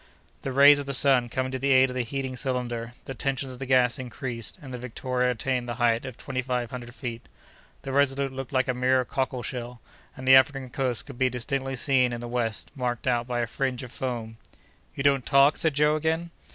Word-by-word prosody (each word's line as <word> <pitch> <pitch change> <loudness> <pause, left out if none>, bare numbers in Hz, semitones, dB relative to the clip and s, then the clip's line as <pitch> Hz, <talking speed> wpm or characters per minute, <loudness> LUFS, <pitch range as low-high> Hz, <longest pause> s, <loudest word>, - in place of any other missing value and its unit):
The 135 - -3
rays 140 +2 +7
of 140 - -5
the 140 - 0
sun 130 -3 +4
coming 130 +2 -2
to 130 - -3
the 140 +2 0
aid 130 -1 +5
of - - -7
the 130 - +1
heating 130 +2 -4
cylinder, 120 -3 -3
the 135 - -5
tension 135 0 -2
of 125 - -11
the 135 - -5
gas 125 -2 +3
increased, 125 - -5
and 135 -6 -10
the 125 - -5
Victoria 125 +1 -1
attained 125 0 -1
the 120 - -3
height 120 -1 +1
of 130 - -8
twenty 130 -2 -3
five 125 -2 -2
hundred 120 -1 -8
feet. 120 -4 -6 0.6
The 135 - -5
Resolute 135 0 +1
looked 135 -1 -6
like 130 0 +1
a 125 - +1
mere 125 +1 +2
cockle 130 -1 -2
shell, 125 -1 -5 0.4
and 130 0 -7
the 130 - +8
African 130 -1 +3
coast 120 -4 -1
could 120 - -11
be 130 -1 +3
distinctly 135 +2 -3
seen 130 -1 +2
in 120 - -4
the 120 - -6
west 120 -3 -2
marked 125 -3 -2
out 120 -1 +1
by 120 -1 -1
a - - +1
fringe 130 +2 -2
of 125 - -9
foam. 115 -4 -4 0.6
"You 135 - -3
don't 140 -2 +3
talk?" 140 +2 +5
said 160 -3 0
Joe, 150 +1 +3
again. 160 +2 -1
130 Hz, 225 wpm, -26 LUFS, 120-135 Hz, 0.6 s, the